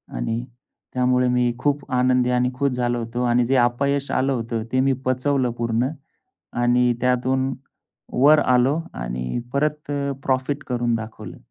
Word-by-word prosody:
आणि 115 - -2 0.5
त्यामुळे 125 0 +2
मी 125 -1 +2
खूप 145 +1 -1
आनंदी 125 0 +3
आणि 125 0 +2
खुश 140 +2 0
झालो 120 -1 -1
होतो 120 +2 -3
आणि 120 0 +3
जे 135 +3 +1
अपयश 140 +3 +1
आलं 135 +1 +1
होतं 115 -2 -3
ते 130 - +2
मी 135 - +3
पचवलं 130 0 +1
पूर्ण 115 +1 0 0.8
आणि 125 0 +3
त्यातून 130 +2 +1 0.7
वर 150 +2 +7
आलो 130 +4 +3
आणि 60 - -4
परत 150 +1 -1 0.3
प्रॉफिट 135 +2 -1
करून 120 -2 0
दाखवलं. 110 -3 -7
125 Hz, 140 wpm, -22 LUFS, 120-135 Hz, 0.8 s, वर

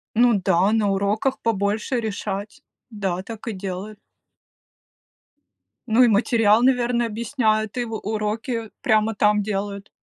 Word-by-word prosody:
Ну 240 0 +5
да, 190 +5 +3
на 215 -2 +2
уроках 210 +7 0
побольше 215 +3 0
решать. 210 +4 -5 0.3
Да, 190 -4 -3
так 225 +3 -9
и - - -2
делают. 195 +2 -6 1.9
Ну, 230 +3 +4
и - - +5
материал, 220 +1 +3
наверно, 245 -2 +2
объясняет, 220 -1 -1
и 240 - 0
в 225 -1 -6
уроки 220 +2 -3
прямо 220 0 +2
там 210 0 +3
делают. 200 -1 -4
215 Hz, 125 wpm, -22 LUFS, 205-230 Hz, 1.9 s, Ну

